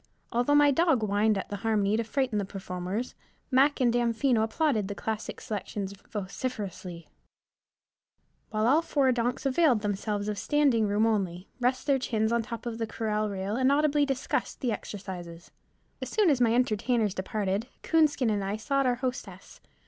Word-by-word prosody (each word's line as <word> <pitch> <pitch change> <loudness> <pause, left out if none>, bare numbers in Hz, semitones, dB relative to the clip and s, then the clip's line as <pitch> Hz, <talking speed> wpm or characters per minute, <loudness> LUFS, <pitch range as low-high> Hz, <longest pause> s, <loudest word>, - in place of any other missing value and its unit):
Although 245 +5 +2
my 290 0 +6
dog 310 -5 +2
whined 210 +1 +2
at 195 - -5
the 205 - -4
harmony 210 -1 +1
to 230 - 0
frighten 240 -1 -1
the - - -1
performers, 190 +3 -4 0.4
Mac 275 +3 +4
and 245 -3 +3
Damfino 240 0 +2
applauded 225 -2 +1
the 205 - -5
classic 220 +1 -4
selections 200 -2 -4 0.2
vociferously, 195 -5 -5 1.4
while 215 0 0
all 285 +7 +5
four 280 -5 +2
donks 245 +3 -1
availed 270 -4 +3
themselves 205 0 -2
of 210 -1 -2
standing 275 -7 +2
room 205 +2 +2
only, 190 -5 -1
rest 255 +2 0
their 280 -2 +3
chins 220 -3 0
on 235 0 +2
the 220 - -10
top 230 +1 -6 0.2
corral 215 -1 -1
rail, 195 +1 -3
and 260 +2 +3
audibly 295 0 +3
discussed 270 -2 -2
the 250 -4 0
exercises. 180 -5 -7 0.5
As - - -4
soon 415 -7 +3
as 260 -3 +1
my 235 -1 +4
entertainers 230 -3 +1
departed, 200 +3 -2 0.2
Coonskin 300 -7 +3
and 205 -2 -1
I 200 +2 -2
sought 275 +4 0
our 245 - +2
hostess. 255 0 -6
225 Hz, 165 wpm, -28 LUFS, 205-260 Hz, 1.4 s, my